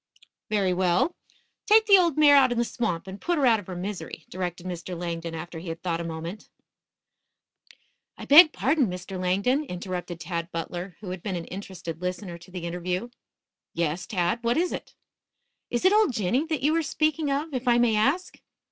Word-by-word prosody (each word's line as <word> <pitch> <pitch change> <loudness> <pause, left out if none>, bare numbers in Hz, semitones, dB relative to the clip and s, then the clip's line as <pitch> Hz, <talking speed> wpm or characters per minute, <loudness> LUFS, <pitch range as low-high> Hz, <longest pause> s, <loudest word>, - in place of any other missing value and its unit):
"Very 195 -4 +1
well, 180 - +1 0.5
take 440 +1 +6
the 400 -2 +7
old 340 -5 +2
mare 295 -2 +7
out 265 -3 +6
in 240 - -1
the 235 - +2
swamp 215 -8 -2
and 190 +1 -9
put 345 -1 0
her 285 - +2
out 230 -3 +5
of 205 - -12
her 185 - -6
misery," 190 +2 -6
directed 180 -1 -5
Mr. 180 0 -5
Langdon 165 -1 -4
after 165 0 -7
he 170 +1 -7
had 165 +1 -6
thought 170 -2 -1
a - - -4
moment. 165 +5 -6 1.7
"I - - -8
beg 310 +3 +9
pardon, 280 -2 +1
Mr. 180 +1 -6
Langdon," 200 +11 +1
interrupted 180 - -5
Tad 170 0 -4
Butler, 175 +2 -5
who 190 -4 -6
had 185 -1 -6
been 195 -1 -3
an 170 -1 -4
interested 185 -4 -7
listener 180 -1 -4
to 175 - -16
the 180 -2 -6
interview. 180 +6 -3 0.7
"Yes, 170 +1 -1
Tad; 180 0 0
what 235 +2 +1
is 350 +2 +1
it?" - - -7 0.7
"Is 240 +8 -1
it 375 - +6
old 425 -10 +4
Jinny 235 - 0
that 310 -5 -2
you 305 +3 +3
are 330 - +2
speaking 310 0 0
of, 290 +3 -2
if 255 0 -3
I 240 -1 +5
may 240 -2 +3
ask?" 275 +13 0
190 Hz, 195 wpm, -26 LUFS, 175-270 Hz, 1.7 s, beg